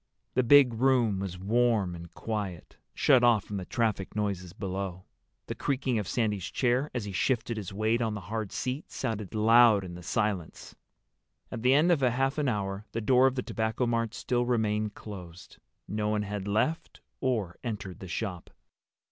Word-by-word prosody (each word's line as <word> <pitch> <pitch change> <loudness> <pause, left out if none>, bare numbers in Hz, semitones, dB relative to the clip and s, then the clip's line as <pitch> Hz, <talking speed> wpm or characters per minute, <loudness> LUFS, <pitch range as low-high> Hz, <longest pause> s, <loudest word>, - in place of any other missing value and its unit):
The 130 - +3
big 130 0 +6
room 120 -4 +2
was 95 -2 -4
warm 110 -1 +1
and 85 -1 -9
quiet, 105 -6 -5 0.2
shut 125 -2 +4
off 115 -5 +5
from 105 - -5
the 95 - -5
traffic 110 -5 -1
noises 100 -4 -2
below. 95 -2 -5 0.4
The - - -4
creaking 130 -4 -1
of 100 - -4
Sandy's 105 -6 -1
chair, 130 +3 +1
as 120 -4 -2
he 100 - -5
shifted 115 +4 0
his 100 -4 -5
weight 110 +4 0
on 110 -2 -1
the 105 - -5
hard 105 +2 -4
seat, 130 +4 -3
sounded 110 -5 -4
loud 110 -1 +6
in 90 -2 -7
the 90 - -9
silence. 100 -2 -2 0.8
At - - -5
the 130 +3 +4
end 160 +5 +4
of 160 -5 +3
half 135 +3 +1
an 145 -3 +1
hour 100 -1 -3
the 115 - -1
door 125 +4 +4
of 135 - -1
the 125 - -2
Tobacco 110 +2 -1
Mart 115 -1 -1
still 120 0 0
remained 110 -3 0
closed. 90 -4 -10 0.3
No 105 0 -1
one 105 -1 0
had 105 -1 -4
left 110 +11 -1 0.2
or 110 -10 -1
entered 105 -6 -5
the 95 - -8
shop. 90 -1 -4
110 Hz, 180 wpm, -29 LUFS, 100-120 Hz, 0.8 s, big